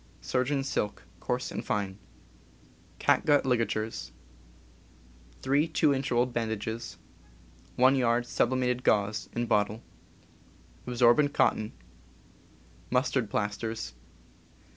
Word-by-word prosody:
Surgeon's 130 - -1
silk, 105 - -2 0.2
coarse - - -2
and - - -4
fine. 100 -1 -2 1.0
Catgut 145 -2 +3
ligatures. 115 -3 -1 1.3
3 140 +4 +2
2 155 -3 +2
in. 135 0 -1
rolled 120 +1 +1
bandages. 110 0 -3 0.8
1 130 +2 +5
yd. 120 -1 +2
sublimated 125 0 0
gauze, 105 0 +1
in 120 - -1
bottle. 105 0 0 1.0
Absorbent 125 +4 +4
cotton. 110 0 +2 1.2
Mustard 125 -3 +1
plasters. 105 - -3
120 Hz, 90 wpm, -29 LUFS, 110-130 Hz, 1.3 s, 1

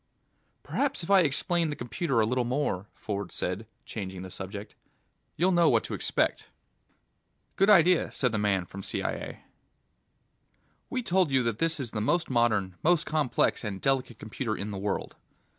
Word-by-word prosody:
"Perhaps 280 -8 -1
if 165 - -3
I 195 - +8
explain 165 +1 +1
the 145 - -3
computer 120 +1 -1
a - - +3
little 125 +3 +1
more," 120 -6 -1
Ford 100 -1 -4
said, 95 +5 -3 0.2
changing 95 -3 -6
the 95 - -8
subject, 100 +3 -7 0.6
"you'll 180 +3 +2
know 175 -2 +5
what - - +3
to - - -6
expect." - - 0 1.1
"Good 195 +2 +3
idea," 180 -3 +5
said 125 -3 0
the 110 - -1
man 100 -3 +1
from 100 +2 -9
CIA. - - -4 1.5
"We 255 -1 -2
told 185 -4 +2
you 130 -2 +2
that 115 -2 -1
this 165 -1 +1
is 125 -5 -4
the 105 - -2
most 170 +7 +1
modern, 110 -6 +1
most 170 0 +3
complex 150 -6 +1
and 100 -3 -4
delicate 130 -3 0
computer 110 +1 -4
in 105 +1 -4
the 100 - -5
world 100 0 -3
120 Hz, 165 wpm, -28 LUFS, 105-165 Hz, 1.5 s, I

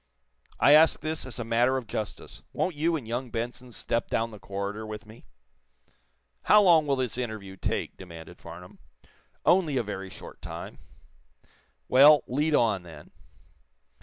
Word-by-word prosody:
"I 145 - +6
ask 155 +1 +6
this 155 -3 -3
as 125 - -5
a 120 - -3
matter 120 +3 +2
of 130 - -5
justice. 110 -1 -6
Won't 185 - -1
you 160 +3 0
and 135 -8 -5
young 120 +2 -3
Benson 120 +2 -5
step 115 +1 -2
down 115 0 -1
the 105 - -11
corridor 100 +2 -5
with 110 -1 -7
me?" 110 +1 -15 1.2
"How 210 - +7
long 165 -5 +5
will 140 - +2
this 125 -2 -2
interview 110 -6 -5
take?" - - -3
demanded 85 -2 -11
Farnum. 85 +2 -12 0.7
"Only 165 -7 +3
a 125 - +1
very 95 -2 -6
short - - -12
time." - - -8 1.1
"Well, 145 +3 +7
lead 150 +4 +1
on, 110 -7 +2
then." 85 -2 -13
120 Hz, 155 wpm, -27 LUFS, 105-145 Hz, 1.2 s, How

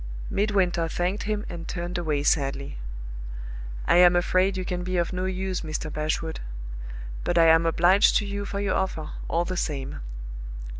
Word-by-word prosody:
Midwinter 190 -5 +2
thanked 180 +5 -1
him 210 0 -1
and 170 -1 -6
turned 175 +1 -4
away 155 -5 0
sadly. 140 - 0 1.1
"I - - +5
am 175 0 +7
afraid 185 +2 +3
you 185 - -2
can 180 -1 -2
be 185 0 -1
of 170 +1 0
no 185 0 -1
use, 190 0 -2
Mr. 155 -1 -4
Bashwood 155 +1 -1 0.8
but 175 - 0
I 165 - +7
am 165 +1 +6
obliged 180 +5 +5
to 210 - 0
you 200 0 -3
for 200 0 -3
your 200 -1 +1
offer, 160 -5 -1 0.2
all 170 +1 +1
the 185 - -3
same." 140 -5 -2
175 Hz, 165 wpm, -26 LUFS, 165-190 Hz, 1.1 s, am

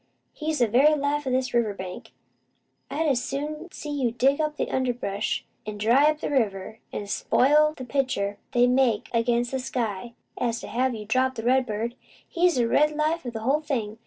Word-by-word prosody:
He's 310 0 -2
the 240 - +3
very 275 +8 +5
life 290 0 -1
o' - - +1
this 255 -1 0
river 225 -4 +1
bank. 185 -1 -8 0.8
I'd 320 +2 -1
as 265 -5 +1
soon 305 +5 -5
see 300 - -7
you 270 -4 0
dig 270 +5 +2
up 305 0 -2
the - - -2
underbrush, 245 -6 -1 0.2
an' 210 -1 -6
dry 240 +8 +4
up 305 0 -2
the - - -2
river, 220 -5 -1
an' 205 - -4
spoil 300 +9 +3
the 255 - -6
picture 235 -7 -1
they 245 -1 +5
make 250 -3 +2
against 235 +1 +1
the 265 - -1
sky, 235 -3 -3 0.2
as 235 -2 -1
to - - -8
hev' 255 0 0
you 210 -1 -7
drop 260 +4 +1
the 225 - -5
redbird. 235 -2 +1 0.3
He's 350 0 +2
the 240 -2 +2
red 300 +5 +3
life 310 -1 0
o' - - -1
the 225 -2 -6
whole 275 +7 +1
thing! 230 -8 -3
255 Hz, 195 wpm, -25 LUFS, 225-290 Hz, 0.8 s, very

